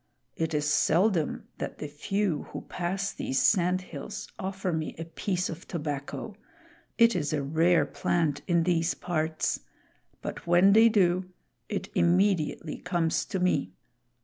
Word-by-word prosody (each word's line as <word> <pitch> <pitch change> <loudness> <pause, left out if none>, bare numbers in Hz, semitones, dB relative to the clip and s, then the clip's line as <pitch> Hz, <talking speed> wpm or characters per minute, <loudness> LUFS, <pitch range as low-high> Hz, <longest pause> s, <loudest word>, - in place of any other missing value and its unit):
It 160 -1 -1
is 150 0 0
seldom 165 +3 +2
that - - -4
the 150 - -5
few 170 +3 -2
who - - -6
pass 190 +3 -3
these 135 - -1
sand 185 -2 +3
hills 150 -6 -7
offer 190 -1 -2
me 160 -1 -3
a 165 - -5
piece 180 +2 -2
of 165 +1 -8
tobacco 150 +6 -4 0.6
it 230 -2 +5
is 155 -4 -1
a 145 -2 0
rare 165 +5 +3
plant 160 -4 0
in 170 -2 +3
these 170 -1 +1
parts 160 -2 -1 0.6
but - - -6
when 175 +3 +6
they 225 +2 +7
do, 185 -3 +2 0.4
it 200 -1 -3
immediately 175 -3 +1
comes 170 -3 0
to 195 - -3
me. 180 - +1
175 Hz, 145 wpm, -28 LUFS, 155-190 Hz, 0.6 s, they